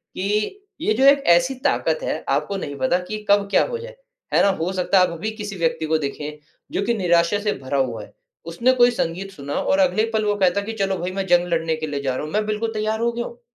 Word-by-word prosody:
कि, 210 Hz, -, -1 dB, 0.2 s
"ये 215 Hz, -, +2 dB
जो 255 Hz, -, +1 dB
एक 280 Hz, 0 st, +6 dB
ऐसी 260 Hz, +9 st, +1 dB
ताकत -, -, 0 dB
है -, -, -3 dB
आपको 200 Hz, -, 0 dB
नहीं 145 Hz, -6 st, -5 dB
पता 175 Hz, +8 st, +2 dB
कि 215 Hz, 0 st, -5 dB
कब 200 Hz, 0 st, +4 dB
क्या -, -, +5 dB
हो 480 Hz, -, -3 dB
जाए, -, -, -9 dB, 0.4 s
है -, -, +5 dB
ना? 200 Hz, -, +5 dB
हो 185 Hz, -1 st, -1 dB
सकता 185 Hz, +1 st, +2 dB
है 180 Hz, -, +6 dB
आप -, -, -6 dB
अभी 195 Hz, +7 st, -4 dB
किसी 205 Hz, -1 st, -5 dB
व्यक्ति 165 Hz, -1 st, 0 dB
को 160 Hz, 0 st, +2 dB
देखे 150 Hz, +1 st, -5 dB, 0.3 s
जो -, -, -1 dB
कि 235 Hz, -, +1 dB
निराशा 175 Hz, +1 st, +2 dB
से 210 Hz, 0 st, 0 dB
भरा 130 Hz, +2 st, -2 dB
हुआ 120 Hz, -5 st, -1 dB
है, -, -, -15 dB, 0.3 s
उसने 235 Hz, +10 st, +2 dB
कोई 245 Hz, -1 st, +5 dB
संगीत 195 Hz, -3 st, -3 dB
सुना 145 Hz, -5 st, -7 dB
हो -, -, 0 dB
और 285 Hz, -, +3 dB
अगले 245 Hz, -6 st, +3 dB
पल 215 Hz, -1 st, +1 dB
वो 205 Hz, 0 st, +1 dB
कहता 190 Hz, 0 st, +2 dB
है -, -, -8 dB
कि 225 Hz, -, -4 dB
चलो 195 Hz, -1 st, 0 dB
भाई 180 Hz, +2 st, -3 dB
मैं -, -, -4 dB
जंग 175 Hz, 0 st, +4 dB
लड़ने 165 Hz, -1 st, 0 dB
के 155 Hz, 0 st, -4 dB
लिए 145 Hz, -1 st, -3 dB
जा 135 Hz, -2 st, -1 dB
रहा 140 Hz, -, -3 dB
हूँ, 155 Hz, -, -8 dB
मैं 210 Hz, 0 st, +1 dB
बिल्कुल 220 Hz, +1 st, -2 dB
तैयार 215 Hz, +1 st, -1 dB
हो 235 Hz, 0 st, +2 dB
गया 240 Hz, 0 st, -3 dB
हूँ।" 235 Hz, -, -10 dB
195 Hz, 270 wpm, -22 LUFS, 165-220 Hz, 0.4 s, एक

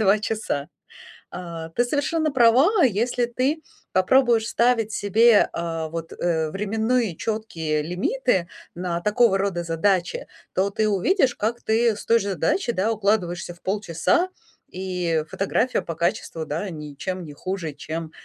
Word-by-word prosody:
2 210 Hz, 0 st, +4 dB
часа. 210 Hz, -10 st, -3 dB, 0.6 s
А, 170 Hz, -2 st, -7 dB
ты 205 Hz, +9 st, +1 dB
совершенно 305 Hz, +3 st, 0 dB
права, 270 Hz, -, +5 dB
если 240 Hz, +1 st, +2 dB
ты 260 Hz, +6 st, -1 dB, 0.3 s
попробуешь 230 Hz, +4 st, +4 dB
ставить 235 Hz, -3 st, +2 dB
себе, 220 Hz, +2 st, +4 dB
а, 165 Hz, -1 st, -3 dB
вот, 165 Hz, 0 st, -6 dB
э, 160 Hz, -3 st, 0 dB
временные 220 Hz, +1 st, 0 dB
четкие 165 Hz, -8 st, -2 dB
лимиты 180 Hz, -, 0 dB, 0.3 s
на 175 Hz, -1 st, -2 dB
такого 210 Hz, +1 st, +3 dB
рода 195 Hz, -3 st, -1 dB
задачи, 175 Hz, +2 st, 0 dB, 0.3 s
то 190 Hz, +2 st, +1 dB
ты 215 Hz, +1 st, 0 dB
увидишь, 250 Hz, -, +2 dB
как 230 Hz, +3 st, -2 dB
ты 225 Hz, 0 st, +2 dB
с 205 Hz, -, -9 dB
той 230 Hz, 0 st, +4 dB
же 200 Hz, -2 st, -3 dB
задачи, 215 Hz, -, 0 dB
да, 215 Hz, +1 st, 0 dB
укладываешься 195 Hz, -5 st, 0 dB
в 175 Hz, -, -22 dB
полчаса, 200 Hz, -, 0 dB, 0.4 s
и 180 Hz, -4 st, -1 dB
фотография 200 Hz, +3 st, 0 dB
по 170 Hz, -2 st, -6 dB
качеству, 165 Hz, -1 st, -2 dB
да, 165 Hz, +7 st, -3 dB
ничем 160 Hz, +3 st, -5 dB
не 150 Hz, -, -9 dB
хуже, 170 Hz, -1 st, -4 dB
чем 160 Hz, +2 st, -6 dB
195 Hz, 140 wpm, -23 LUFS, 170-230 Hz, 0.6 s, права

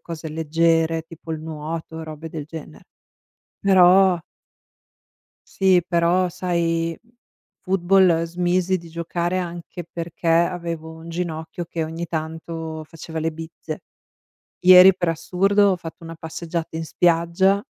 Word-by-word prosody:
cose 165 Hz, -1 st, -7 dB
leggere 160 Hz, +1 st, +1 dB
tipo 165 Hz, 0 st, -9 dB
il 155 Hz, -, -4 dB
nuoto, 160 Hz, +1 st, -6 dB
robe 155 Hz, 0 st, -8 dB
del 155 Hz, -2 st, -6 dB
genere. 150 Hz, -, -10 dB, 0.8 s
Però 190 Hz, -1 st, +6 dB, 1.3 s
Sì, 190 Hz, -2 st, +3 dB
però 175 Hz, +1 st, +2 dB
sai, 170 Hz, -2 st, -1 dB
mhmm, 235 Hz, -, -29 dB, 0.5 s
football 185 Hz, -2 st, +3 dB
smisi 180 Hz, +2 st, 0 dB
di 170 Hz, -, -12 dB
giocare 170 Hz, +2 st, -2 dB
anche 175 Hz, -1 st, -6 dB
perché 170 Hz, 0 st, -5 dB
avevo 170 Hz, -1 st, 0 dB
un 160 Hz, +1 st, -11 dB
ginocchio 165 Hz, 0 st, -4 dB
che 165 Hz, 0 st, -4 dB
ogni 165 Hz, +2 st, -5 dB
tanto 160 Hz, 0 st, -5 dB
faceva 160 Hz, 0 st, -8 dB
le 160 Hz, 0 st, -1 dB
bizze. 160 Hz, -1 st, -8 dB, 0.8 s
Ieri, 185 Hz, +1 st, +9 dB
per 175 Hz, -2 st, -1 dB
assurdo, 195 Hz, +5 st, +2 dB
ho -, -, +1 dB
fatto 165 Hz, -1 st, -10 dB
una 165 Hz, 0 st, -8 dB
passeggiata 160 Hz, 0 st, -5 dB
in 165 Hz, -, -3 dB
spiaggia 175 Hz, +4 st, +2 dB
165 Hz, 125 wpm, -22 LUFS, 160-180 Hz, 1.3 s, Ieri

